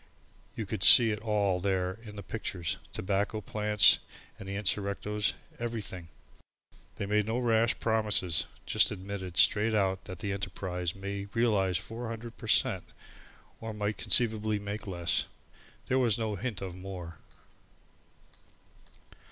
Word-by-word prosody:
You 110 - -4
could 100 0 -5
see 115 +4 +9
it 105 - -3
all 105 -4 0
there 95 +1 -1
in 105 -2 -10
the 100 - -7
pictures 90 -5 -3
tobacco 100 +3 -1
plants 105 0 +4 0.4
and 95 - -8
the 100 - -4
insurrectos 105 +1 0 0.3
everything. 105 -7 -5 0.9
They - - -4
made 105 +1 +1
no 115 +2 -1
rash 115 -2 +2
promises, 105 -7 +1 0.2
just - - +4
admitted 95 -2 -6
straight 110 +1 +5
out 95 -2 0
that 95 - -7
the 100 +3 -4
enterprise 95 -2 -4
might 100 +1 -5
realise 100 -6 +2
400 115 0 -7
per - - -10
cent. - - +2 0.7
or 110 -1 -6
might 105 0 -2
conceivably 110 -3 +2
make 105 +1 -6
less. 85 -3 0 0.6
There 130 - +2
was 115 -5 +2
no 110 -2 -2
hint 105 0 -4
of 95 -2 -5
more. 90 -3 -8
105 Hz, 135 wpm, -30 LUFS, 95-110 Hz, 0.9 s, see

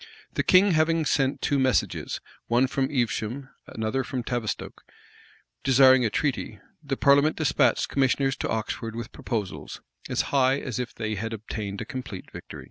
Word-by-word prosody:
The - - +1
king 190 +2 +5
having 160 0 +2
sent 135 -1 +1
two 140 - +2
messages, 130 -1 0 0.3
one 120 +3 +3
from 135 0 -1
Evesham,[*] 125 0 -2 0.2
another 110 +4 -2
from 125 -1 -4
Tavistoke,[] 120 -3 -4 0.8
desiring 130 -1 +6
a - - +2
treaty, 120 -5 -2 0.2
the 140 -3 -3
parliament 140 +2 +4
despatched 155 - +2
commissioners 135 0 +1
to - - -3
Oxford 110 0 -3
with 115 0 -6
proposals, 105 -6 -4 0.3
as - - +1
high 135 0 +4
as 125 -4 -4
if 125 -2 -4
they 110 -1 -3
had 110 +3 -3
obtained 105 -2 -5
a - - -4
complete 120 -6 -7
victory. - - -9
130 Hz, 155 wpm, -26 LUFS, 115-140 Hz, 0.8 s, desiring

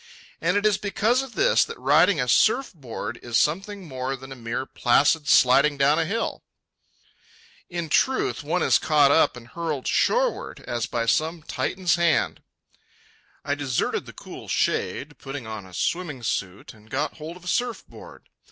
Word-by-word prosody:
And 180 +4 +2
it 205 - 0
is 210 -2 +3
because 220 +5 +1
of 265 -4 -9
this - - +4
that - - -7
riding 150 +7 +4
a 125 - 0
surf 225 - +3
board 120 -5 -7
is 120 -2 -1
something 195 - -1
more 130 -1 -3
than 135 +1 -12
a - - -6
mere 120 +1 -4
placid 145 +5 +2
sliding 140 +2 +5
down 140 +3 +3
a 165 - +1
hill. 225 +7 -2 1.3
In 170 -2 -4
truth, 265 - +1
one - - 0
is - - +4
caught 145 -3 +4
up 150 -4 +3
and 120 -1 -13
hurled 160 -4 -4
shoreward - - 0
as 120 0 -3
by 120 -1 -2
some 160 +6 0
Titan's 180 +1 -1
hand. 170 -1 +1 1.0
I 140 - 0
deserted 145 -4 -2
the - - -10
cool - - -11
shade, 150 +2 -1
put 135 0 -7
on 110 -7 -7
a - - -15
swimming 150 - -3
suit, 95 -3 -3
and 110 0 -20
got 145 +5 -2
hold 160 +3 -8
of 180 - -18
a - - -11
surf 245 +4 -1
board. - - -14
150 Hz, 170 wpm, -24 LUFS, 130-180 Hz, 1.3 s, sliding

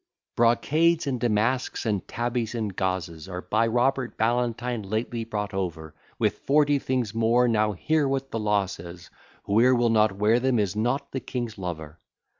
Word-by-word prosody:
Brocades, 155 +8 +3
and 130 -3 -2
damasks, 120 +3 0
and 105 -4 -1
tabbies, 120 -1 -2
and 105 -5 -3
gauzes, 90 -3 -3
Are, 90 0 -5
by 110 +5 +1
Robert 125 +2 0
Ballantine, 120 +1 0
lately 110 +3 -3
brought 105 -3 -4
over, 85 -5 -4 0.2
With - - 0
forty 145 0 +3
things 125 -6 -2
more: 115 +2 +3
now 110 -2 +2
hear 150 - +1
what 135 0 -2
the 115 - -2
law 105 -2 +2
says, 85 -2 -10 0.3
Whoe'er 120 +5 +4
will 120 -1 +2
not 105 -3 +3
wear 110 +4 +3
them 130 -1 +1
is 105 -2 0
not 125 +6 -1
the 135 - -2
king's 120 -4 -5
lover. 80 -3 -6
115 Hz, 165 wpm, -26 LUFS, 100-125 Hz, 0.3 s, Whoe'er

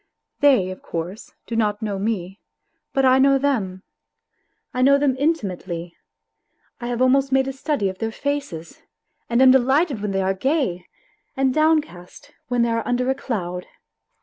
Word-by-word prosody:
They, 255 -11 +4
of 185 - -9
course, 175 +5 -6
do 230 - -5
not 210 -2 0
know 205 -2 -2
me, 195 -2 -3 0.5
but 270 -1 +2
I 260 0 +5
know 275 0 +5
them. 210 -10 -1 0.9
I 250 - -1
know 280 +2 +6
them 280 -2 +1
intimately, 185 - -2 0.8
I 240 - -5
have 245 +1 0
almost 270 +1 +3
made 265 0 +3
a 270 - -3
study 270 -5 -1
of 190 0 -5
their 225 0 -2
faces, 280 - -4 0.5
and 240 +2 +4
am 260 - +8
delighted 265 - +2
when 210 - -2
they 195 -1 0
are 190 +1 +1
gay, 215 - -1 0.5
and 265 -1 +2
downcast 300 - -1 0.2
when 245 -1 +1
they 235 - +1
are 230 -1 -2
under 250 +1 +1
a - - +2
cloud. 180 -9 -4
245 Hz, 165 wpm, -22 LUFS, 190-270 Hz, 0.9 s, am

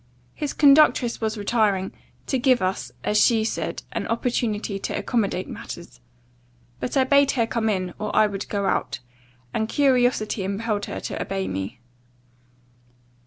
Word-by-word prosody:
His 295 -2 -3
conductress 280 -5 +5
was 220 0 -1
retiring, 205 -3 +1 0.3
to 265 - 0
give 255 -1 +4
us, 185 +1 -2
as 210 0 +2
she 225 -2 +4
said, 220 - -3
an - - -3
opportunity 225 -4 -1
to - - -3
accommodate 200 -6 -1
matters. - - -9 0.8
But 250 - -2
I 265 - +5
bade 280 +1 +4
her 235 -4 +2
come 225 -1 -1
in, 185 -3 -1
or 215 - -2
I 215 - +6
would 200 -2 -4
go 200 -1 -1
out; 190 - 0 0.6
and 220 0 -1
curiosity 245 -7 +2
impelled 205 +2 -2
her - - -5
to - - -4
obey 195 -1 -2
me. 95 +6 -5
220 Hz, 150 wpm, -24 LUFS, 200-245 Hz, 0.8 s, I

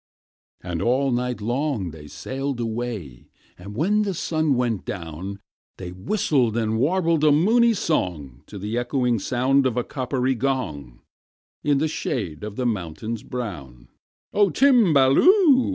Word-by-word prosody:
And 85 -2 -4
all 130 +3 +1
night 125 -1 -2
long 120 - -1
they 75 -1 -11
sailed 135 - -4
away; 110 - -5 0.3
And 100 +3 -10
when 200 - +2
the 200 -3 -1
sun 155 -3 0
went 120 -5 -1
down, 90 +2 -6 0.4
They 90 -2 -7
whistled 120 - 0
and 110 -1 0
warbled 165 +2 +1
a 155 - +6
moony 225 +10 +4
song 80 - -2
To 105 - -9
the 105 +5 -2
echoing 120 -2 0
sound 130 +5 +2
of 125 -2 -3
a 125 - +1
coppery 130 0 -1
gong, 110 - -3 0.6
In 145 -1 +2
the 155 +3 +1
shade 100 - -4
of 105 -1 -6
the 125 - -2
mountains 110 +1 -3
brown. 75 - -7 0.4
"O 205 -1 +4
Timballoo! 255 - +5
125 Hz, 140 wpm, -23 LUFS, 100-145 Hz, 0.6 s, a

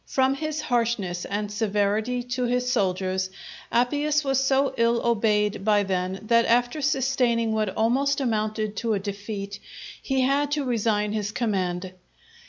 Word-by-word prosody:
From 265 0 +2
his 310 +2 -3
harshness 230 -9 -1
and 205 +1 -3
severity 210 +3 0
to 250 0 -2
his 250 +1 0
soldiers, 190 -3 0 0.4
Appius 290 +5 +1
was 270 -1 +1
so 270 0 +2
ill 235 0 +2
obeyed 210 -3 +1
by 205 -1 +3
them, 185 -1 -2
that 230 +1 +3
after 245 +5 +2
sustaining 255 -5 +1
what 215 -2 0
almost 270 +6 +2
amounted 215 -3 -1
to 230 0 0
a - - -1
defeat, 200 0 -6 0.4
he 265 -1 0
had 275 +2 +2
to 295 -2 -1
resign 215 -4 0
his 210 -1 -2
command. 185 -5 -2
230 Hz, 145 wpm, -25 LUFS, 205-255 Hz, 0.4 s, by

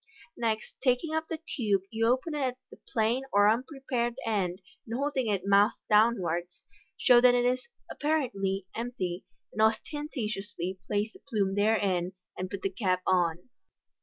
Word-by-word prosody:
Next 225 -2 -2
taking 265 +5 +2
up 320 0 -1
the 325 - -3
tube, 220 - -1
you 225 0 +1
open 260 +6 +1
it 300 - -2
at 255 -2 -1
the - - -13
plain 230 +3 +1
or 205 0 +5
unprepared 245 0 0
end, 190 -5 0 0.3
and 230 - -3
holding 275 -2 0
it 195 -3 0
mouth 200 +2 +4
downwards, 180 -6 +2 0.3
show 240 -1 +6
that 250 0 +6
it 245 0 +2
is 255 +1 0 0.2
(apparently) 200 -11 -1
empty; 205 -7 -4 0.3
then 215 - +2
ostentatiously 215 - -2
place 210 +1 -1
the - - -15
plume 205 -8 -1
therein, 195 -4 +1 0.2
and 185 0 -4
put 200 0 -6
the 195 - +1
cap 185 -2 0
on. 175 +2 +1
220 Hz, 155 wpm, -29 LUFS, 195-250 Hz, 0.3 s, show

